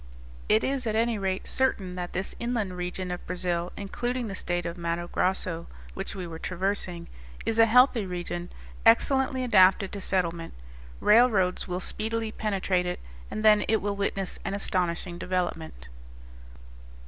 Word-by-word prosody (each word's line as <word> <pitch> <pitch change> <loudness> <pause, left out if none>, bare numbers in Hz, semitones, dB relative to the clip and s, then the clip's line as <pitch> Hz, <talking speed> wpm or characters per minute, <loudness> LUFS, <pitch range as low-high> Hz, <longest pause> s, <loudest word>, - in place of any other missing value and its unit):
It 215 +1 +4
is 265 -3 0
at 215 - 0
any 230 -1 +1
rate 190 -1 -2
certain 200 -8 +2
that 180 -1 -5
this 190 +2 -3
inland 235 -6 -2
region 180 +1 -4
of 180 - -5
Brazil, 175 -1 -2
including 240 +5 -3
the - - -5
state 175 -2 -2
of 170 - -3
Matto 170 0 -3
Grosso, 180 -2 0 0.3
which - - -5
we 185 -2 -5
were 165 -1 -8
traversing, 185 -1 -2 0.4
is 225 - 0
a 225 - +7
healthy 245 -2 +4
region, 175 -1 -4 0.3
excellently 260 - +3
adapted 190 -4 +5
to 200 - -6
settlement; 170 -3 -1 0.5
railroads 210 -5 +4
will 180 0 -2
speedily 220 +3 -1
penetrate 195 -4 -1
it, 180 - -3 0.3
and 215 - -4
then 210 -1 +7
it 220 0 +2
will 205 0 -2
witness 195 -1 -2
an 195 - -2
astonishing 175 -2 -2
development. 170 - -3
190 Hz, 150 wpm, -27 LUFS, 180-220 Hz, 0.5 s, a